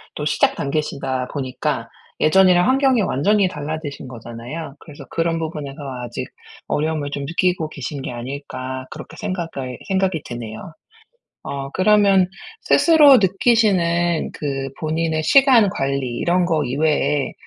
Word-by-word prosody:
또 150 - -4
시작 150 0 +2
단계시다 140 -3 -2
보니까 130 -3 -3 0.3
예전이랑 180 +2 +5
환경이 265 -2 +3
완전히 200 +4 +2
달라지신 150 -3 -6
거잖아요. 125 +5 -8
그래서 150 -3 -12
'그런 165 0 -1
부분에서 150 -4 -5 0.3
아직 120 -1 -5 0.4
어려움을 150 -1 -1
좀 140 -1 -4
느끼고 170 +1 0
계신 140 0 -6
게 130 - -5
아닐까.' 130 +1 -6
그렇게 - - -10
생각을 165 -10 -4
생각이 190 -5 0
드네요. 120 +4 -8 0.7
어 140 -1 -5
그러면 195 -1 +4 0.3
스스로 300 -5 +6
느끼시는 185 -5 +2
그 135 -2 -3
본인의 160 0 -1
시간 260 - +5
관리 135 -5 -2
이런 175 +1 +2
거 160 -3 +1
이외에 145 +1 0
155 Hz, 310 characters per minute, -20 LUFS, 135-185 Hz, 0.7 s, 스스로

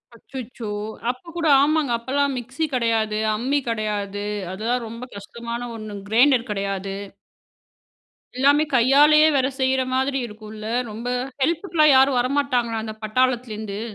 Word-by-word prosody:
அச்சச்சோ! 240 -2 -8 0.4
அப்போ 255 +7 -5
கூட 335 -2 0
ஆமாங்க, 300 -2 +2
அப்பல்லாம் 275 +4 0
மிக்ஸி 260 +6 -3
கிடையாது, 225 -3 +1 0.2
அம்மி 265 +6 0
கிடையாது. 205 -2 -2 0.3
அதுலாம் 230 +4 -2
ரொம்ப 230 +2 -8
கஷ்டமான 235 +4 -6
1 215 -1 -7 0.2
கிரைண்டர் 245 +2 +4
கிடையாது. 195 -1 -3 1.4
எல்லாமே 285 +3 +4
கையாலேயே 290 +5 +6
வேற 265 -1 +3
செய்ற 260 0 +2
மாதிரி 265 +1 +1
இருக்கும்ல 215 0 -9 0.2
ரொம்ப. 225 +3 -6 0.4
ஹெல்ப்புக்குலாம் 315 -1 +3
யாரும் 265 -1 +5
வரமாட்டாங்களா? 250 -3 0
அந்த 220 -1 -5
பட்டாளத்துலருந்து? 220 -3 -1
245 Hz, 115 wpm, -22 LUFS, 220-270 Hz, 1.4 s, கையாலேயே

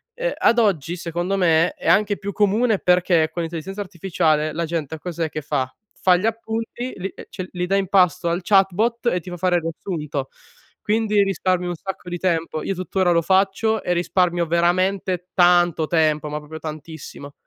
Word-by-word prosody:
Uhm, - - -1
ad 235 - +3
oggi, 175 -6 +1
secondo 175 +2 -2
me, 165 -2 +3
è - - -8
anche 205 +3 +3
più 200 +1 -5
comune, 210 +2 +2
perché 180 -3 +3
con 170 - -2
l'intelligenza 170 +5 -5
artificiale 165 -4 0
la 170 +1 -2
gente 160 -2 -3
cos'è 170 -2 -3
che 155 - -5
fa? 135 -3 -2 0.2
Fa 180 -1 +3
gli 195 - -2
appunti, 225 +2 -3
li 190 +1 -5 0.2
cioè 185 -1 -7
li 180 -1 -2
dà 195 - +1
in 195 -2 +1
pasto 180 -3 +3
al 170 - 0
chatbot 210 +5 +2
e 180 -6 +2
ti 180 - -10
fa 175 - -6
fare 180 +1 +1
il - - -1
riassunto. 150 -5 -4 0.5
Quindi 215 -1 +2
risparmi 185 -2 0
un 175 - -3
sacco 190 +1 -7
di 175 - -3
tempo. 165 -3 -1
Io 195 - -1
tuttora 185 0 0
lo 170 -1 +3
faccio 195 +4 +1
e 180 - -1
risparmio 175 0 +1
veramente 180 +2 +1
tanto 175 -3 +4
tempo, 155 -2 +1
ma 150 - -3
proprio 155 +1 -9
tantissimo. 155 -2 -8
180 Hz, 180 wpm, -22 LUFS, 165-195 Hz, 0.5 s, tanto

